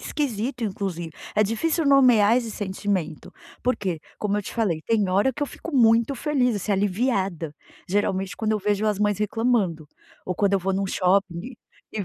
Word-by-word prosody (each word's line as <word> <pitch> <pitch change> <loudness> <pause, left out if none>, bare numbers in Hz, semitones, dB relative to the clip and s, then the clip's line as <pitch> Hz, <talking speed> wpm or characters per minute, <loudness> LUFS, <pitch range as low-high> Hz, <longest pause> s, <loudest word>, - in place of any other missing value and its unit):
esquisito, 245 -3 -3
inclusive. 185 -5 -3 0.2
É 215 - +4
difícil 310 - 0
nomear 245 -6 +5
esse 235 -3 -1
sentimento, 190 -5 -3 0.3
por 250 +1 +1
quê? 180 -6 -3 0.2
Como 210 -1 -1
eu - - -3
te - - -8
falei, 195 -9 0
tem 215 -4 +2
hora 200 +8 +2
que 295 - -5
eu - - +1
fico 330 - -9
muito 230 +2 +4
feliz, 260 -4 +1
assim, 205 +1 -3
aliviada, 195 - 0 0.4
geralmente 195 -1 -1
quando 220 -1 0
eu 215 - +1
vejo 205 +1 0
as 210 -1 0
mães 205 -1 +1
reclamando 210 -8 0 0.4
ou 185 - -2
quando 200 +1 +1
eu 195 - +4
vou 190 +2 -1
num 195 +1 0
shopping 185 -2 +1
e 250 0 -9 0.4
e 205 -3 -3
205 Hz, 185 wpm, -24 LUFS, 190-235 Hz, 0.4 s, nomear